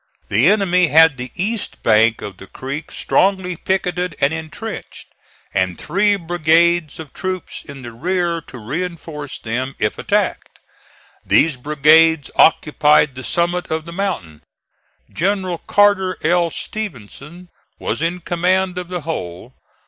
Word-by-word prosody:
The 110 +9 +3
enemy 185 -4 +3
had 160 0 +6
the 125 +1 -5
east 210 +4 -3
bank 110 0 +3
of 100 -3 -7
the 95 - -12
creek 140 - -6
strongly 190 -2 +1
picketed 180 -1 -2
and 140 +3 +2
intrenched, 160 -1 -7 0.4
and 95 -2 0
three 205 +2 +1
brigades 170 -2 +2
of 155 -3 -9
troops 185 -2 -5
in 140 -3 -11
the 120 - -7
rear 170 +4 -1
to 125 - -10
reinforce 150 +3 -5
them 130 +4 -4
if - - -1
attacked. - - -1 0.7
These 155 -2 +3
brigades 150 +3 +4
occupied 150 -2 +4
the 130 0 -8
summit 175 +3 -1
of 160 0 -2
the 170 - -9
mountain. 90 - -4 0.7
General 185 -1 -1
Carter 200 -2 +2
L. 170 +1 +2
Stevenson 170 - -7 0.3
was - - -3
in 175 +2 -1
command 180 +2 0
of 180 - -7
the 180 -1 -4
whole. 120 - -6
165 Hz, 135 wpm, -19 LUFS, 140-180 Hz, 0.7 s, had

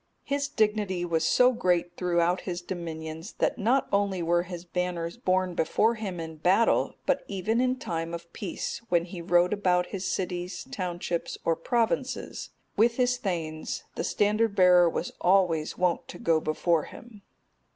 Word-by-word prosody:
His 280 0 -1
dignity 210 -8 0
was 165 -2 0
so 250 +9 +5
great 175 -6 0
throughout 175 0 +1
his 180 -1 -5
dominions, 165 0 -6
that - - 0
not 245 +6 +2
only 200 -3 +1
were 175 +1 +2
his 175 -1 -7
banners 175 -1 -2
borne 185 -5 0
before 215 +7 +2
him 200 -6 -5
in 160 -1 -6
battle, 185 +8 +3
but - - +1
even 210 +4 0
in 255 0 +2
time 165 -9 -4
of 170 0 -8
peace, 200 - -4
when 170 -1 +2
he 180 -1 -8
rode 175 +2 +3
about 180 -3 +2
his 195 -1 -3
cities, 180 0 -3
townships, 175 -5 -3
or 165 - +3
provinces, 240 +8 -1 0.3
with 230 +2 +3
his 250 -1 +2
thegns, 160 -5 -3
the - - -3
standard 210 +1 +1
bearer 180 -2 +6
was - - -3
always 175 -4 +2
wont 180 -1 0
to - - -9
go 165 -1 +2
before 155 +1 +1
him. 220 -3 -13
180 Hz, 160 wpm, -27 LUFS, 170-210 Hz, 0.3 s, bearer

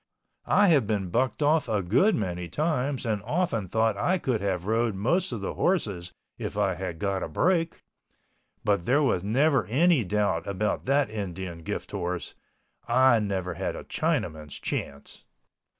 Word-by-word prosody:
I 205 -2 +5
have 140 -10 +4
been 100 -5 -1
bucked 130 - 0
off 150 0 +2
a 105 -3 0
good 130 - +3
many 90 -4 -3
times 145 - -1
and 110 -3 -1
often 145 - -1
thought 110 +3 +1
I 185 - +1
could 125 - -1
have 95 -3 -1
rode 115 0 +1
most 165 - 0
of 115 -4 -4
the 95 - -3
horses 100 - -1 0.3
if - - -5
I - - +2
had 85 - -5
got 95 +1 -1
a - - -2
break, 165 - 0 0.8
but 100 -4 +1
there 140 +4 +4 0.2
never 135 - +3
was - - -13
any 155 +2 +4
doubt 100 -4 0
about 100 +2 -1
that 135 -2 +2
Indian 95 -4 -5
gift 100 +5 -5
horse—I 115 +6 0
never 95 -4 -2
had - - -3
a - - -7
Chinaman's 75 -2 -2
chance. 70 0 -5
105 Hz, 160 wpm, -27 LUFS, 95-140 Hz, 0.8 s, I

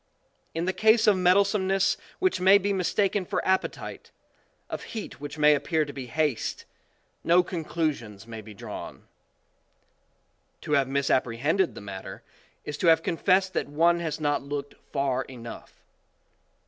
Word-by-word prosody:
In 165 +1 -1
the 185 - 0
case 220 +2 +4
of 210 - +5
mettlesome 190 +2 +3
ness 195 0 +2 0.2
which 375 - +1
may 190 +2 +7
be 200 0 -1
mistaken 195 +1 +1
for - - -3
appetite, 190 0 -2 0.6
of - - -5 0.2
heat 210 - -7
which 145 +1 -7
may 150 0 +6
appear 155 +2 0
to 145 - -8
be 130 -2 -7
haste, 150 -3 -1 0.6
no 175 +2 +5
con 175 -2 -4
clusions 130 -12 -3
may 115 -1 -8
be 105 0 -12
drawn. - - -8 1.6
To - - -7
have 140 -2 +3
misapprehended 140 +5 +1
the - - -8
matter, 100 -2 -8 0.4
is 145 -1 -5
to 175 - +1
have 165 -1 +5
con - - -1
fessed 190 +1 +2
that - - -2
one 170 +4 +3
has 160 -3 -3
not 145 -1 0
looked 145 0 -5 0.2
far 135 -2 0
enough. 120 -3 -11
155 Hz, 155 wpm, -27 LUFS, 140-185 Hz, 1.6 s, may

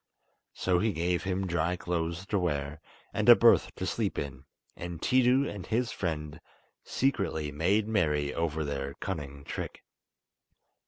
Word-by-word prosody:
So 90 -1 +1
he 110 +1 +1
gave 90 +1 0
him 95 0 -1
dry 85 0 0
clothes 85 +1 -3
to 100 0 0
wear, 75 -3 -2 0.3
and - - +2
a - - +12
berth - - +5
to - - -4
sleep - - -1
in, 70 -1 -5 0.3
and 85 -1 -6
Tiidu 130 +4 +3
and 100 -3 -6
his 115 +2 0
friend 80 -3 -4 0.4
secretly 80 - 0
made 95 +8 +1
merry 75 -9 +1
over 80 -1 -1
their 70 -1 -4
cunning 70 -7 -5
trick. - - -6
85 Hz, 145 wpm, -29 LUFS, 75-95 Hz, 0.4 s, a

